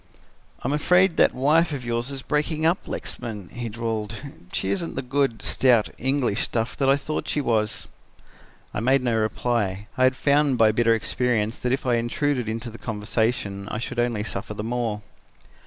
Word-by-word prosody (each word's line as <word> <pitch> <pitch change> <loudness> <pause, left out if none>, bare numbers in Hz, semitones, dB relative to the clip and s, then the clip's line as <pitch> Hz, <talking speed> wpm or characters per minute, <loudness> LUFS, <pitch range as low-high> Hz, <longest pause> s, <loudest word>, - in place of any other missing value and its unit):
"'I'm 135 - 0
afraid 180 +4 +3
that - - +5
wife 155 +6 +3
of 135 -4 -4
yours 120 +1 -1
is 135 -2 -5
breaking 155 +1 0
up, 170 +3 +1
Lexman,' 105 -7 -5
he 120 -1 -5
drawled; 110 -2 -3 0.3
'she 95 - 0
isn't 165 +12 -2
the 135 - -2
good, 135 -2 0
stout, 120 -5 +4
English 130 -5 +1
stuff 115 0 -1
that 135 -1 +2
I 135 - +5
thought 155 +2 -4
she - - 0
was.' 110 -5 0 0.9
"I - - -2
made 130 +3 +3
no 120 -2 +1
reply. 110 -3 0
I 130 - +6
had 130 0 +3
found 140 -1 +3
by 110 -2 +5
bitter 115 +1 +3
experience 115 -1 0
that 125 - -1
if 135 +1 -1
I 120 -2 +3
intruded 125 +1 0
into 115 +1 -4
the 115 - -11
conversation, 105 -2 -1
I - - -3
should 120 +2 -4
only 120 -3 0
suffer 105 0 -5
the 105 - -4
more. 115 -3 -2
120 Hz, 180 wpm, -24 LUFS, 110-135 Hz, 0.9 s, I